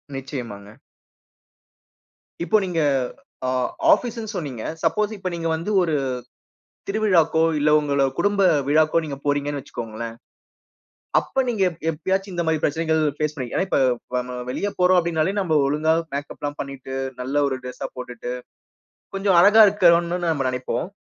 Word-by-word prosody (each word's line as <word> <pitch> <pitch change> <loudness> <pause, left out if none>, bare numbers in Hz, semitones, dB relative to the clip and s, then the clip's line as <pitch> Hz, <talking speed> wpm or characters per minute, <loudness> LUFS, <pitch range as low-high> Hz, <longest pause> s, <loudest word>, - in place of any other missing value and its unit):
நிச்சயமாங்க. 115 -6 -7 1.7
இப்போ 215 +4 +3
நீங்க 175 -3 -2 0.7
ஆ - - 0 0.5
ஆஃபீஸ்ன்னு 230 -4 -3
சொன்னீங்க. 135 -10 -4 0.2
சப்போஸ் 210 +6 +1
இப்ப 185 -2 -4
நீங்க 165 -1 -3
வந்து 170 +6 -4
ஒரு 165 -3 0 1.0
திருவிழாக்கோ, 180 -7 +3 0.2
இல்ல 150 +1 +3
உங்கள 140 -2 +1 0.2
குடும்ப 205 -1 +2 0.3
விழாக்கோ 155 +2 +3
நீங்க 140 -2 -5
போறீங்கன்னு 145 0 -1
வச்சுக்கோங்களேன். 115 -1 -6 1.1
அப்ப 265 - -1
நீங்க 220 -5 0
எப் 165 -2 -11
எப்பயாச்சும் 190 +5 -2
இந்த 170 -1 -1
மாரி 160 -1 +2
பிரச்சனைகள் 160 +1 +1 0.2
ஃபேஸ் 150 0 -1
பண்ணிரு 130 -5 -6
ஏன்னா 190 - +1
இப்ப - - +2 0.4
வ 125 - +2
ம 125 - -5
வெளிய 205 - -2
போறோம் 180 0 +5
அப்டின்னாலே, 170 +2 0
நம்ப 160 -5 +1
ஒழுங்கா 155 +3 +2 0.2
மேக்கப்லாம் 145 0 -5
பண்ணிட்டு 135 -1 -6 0.3
நல்ல 130 +3 -4
ஒரு 130 -1 -3
டிரெஸ்ஸா 125 +1 -5
போட்டுட்டு, 125 -1 -6 0.8
கொஞ்சம் 195 -2 +2
அழகா 210 +4 +8
இருக்கனுன்னு 175 -3 +3
நம்ம 140 -5 0
நெனைப்போம். 125 +3 -3
160 Hz, 135 wpm, -23 LUFS, 135-185 Hz, 1.7 s, அழகா